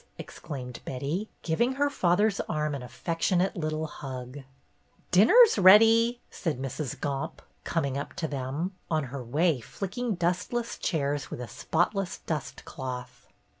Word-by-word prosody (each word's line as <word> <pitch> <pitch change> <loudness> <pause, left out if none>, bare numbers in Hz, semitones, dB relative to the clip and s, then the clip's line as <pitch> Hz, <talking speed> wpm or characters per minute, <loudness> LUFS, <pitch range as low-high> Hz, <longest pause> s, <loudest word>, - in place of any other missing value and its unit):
exclaimed 125 -4 -7
Betty, 145 +11 -3
giving 235 +11 +1
her 285 +2 +2
father's 200 -4 +2
arm 150 -2 -1
an 140 - -4
affectionate 170 - 0
little 155 -2 -2
hug. 130 -3 -7 0.7
"Dinner's 240 - +7
ready," 225 +5 +7
said 160 -8 -3
Mrs. 135 +1 -4
Gomp, 140 -1 -3 0.2
coming 140 -5 -1
up - - -6
to 170 -4 -2
them, 145 +6 -3 0.2
on 155 -2 +1
her 130 0 -6
way 150 +4 +1
flicking 200 - -4
dustless 180 +7 -1
chairs 145 -5 -1
with - - -6
a 125 - -5
spotless 175 - -1
dust 155 -3 -5
cloth. 130 -2 -7
160 Hz, 130 wpm, -28 LUFS, 135-195 Hz, 0.7 s, Dinner's